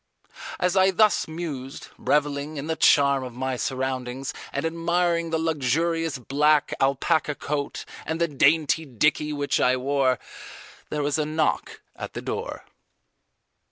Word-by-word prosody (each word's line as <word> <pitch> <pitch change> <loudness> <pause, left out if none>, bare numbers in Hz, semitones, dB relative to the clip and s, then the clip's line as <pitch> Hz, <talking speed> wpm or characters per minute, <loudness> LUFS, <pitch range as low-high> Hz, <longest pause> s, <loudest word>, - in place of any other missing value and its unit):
As 180 +1 +1
I 190 0 +5
thus 210 +3 +3
mused, 155 -5 -6
revelling 145 +1 0
in 140 - -4
the 160 0 -1
charm 140 -3 +4
of 125 -2 -7
my 130 +1 -2
surroundings 130 0 -3 0.2
and 140 - -2
admiring 170 0 0
the 160 - 0
luxurious 160 +1 0
black 145 +4 +2
alpaca 145 +3 +1
coat 145 0 -3 0.2
and 160 +1 -3
the 170 - +2
dainty 155 +2 +3
dickie 150 +3 +1
which 145 -1 0
I 130 +1 +3
wore, 130 -1 +1 0.7
there 150 -1 -2
was 145 +2 0
a 155 - +1
knock 155 0 -1
at - - -7
the - - -4
door. - - -5
150 Hz, 140 wpm, -25 LUFS, 135-160 Hz, 0.7 s, I